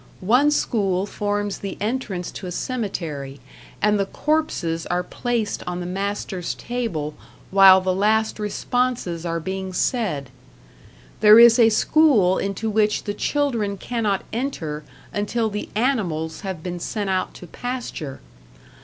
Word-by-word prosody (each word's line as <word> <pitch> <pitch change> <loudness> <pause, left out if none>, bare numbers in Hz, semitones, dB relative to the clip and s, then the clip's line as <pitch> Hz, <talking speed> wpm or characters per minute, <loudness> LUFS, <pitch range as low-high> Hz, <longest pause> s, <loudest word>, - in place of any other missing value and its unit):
One 250 +8 +5
school 200 -10 +1
forms 205 -1 -2
the 195 -1 -5
entrance 210 -5 -3
to 190 - -7
a - - -5
cemetery, 165 - -4 0.4
and 210 0 +3
the 195 - 0
corpses 195 - -1
are 180 0 0
placed 235 +2 -2
on 180 0 -3
the 175 - -4
master's 190 -1 -3
table 215 -12 -3 0.4
while 190 -1 +8
the 185 0 0
last 215 +3 +1
responses 210 -5 -1
are 165 0 -1
being 190 +2 -4
said. 175 - -1 0.9
There 210 +1 +8
is 235 +1 +8
a 225 -1 +7
school 220 - +4
into 195 +3 -2
which 210 0 +1
the 205 - -3
children 230 -5 -1
cannot 215 -2 -1
enter 165 - -3 0.3
until 220 +2 -1
the 210 +1 -4
animals 185 - -1
have 190 -5 -5
been 175 -1 -4
sent 205 +2 -2
out 185 0 -1
to - - -10
pasture. 240 - -5
205 Hz, 135 wpm, -22 LUFS, 180-230 Hz, 0.9 s, while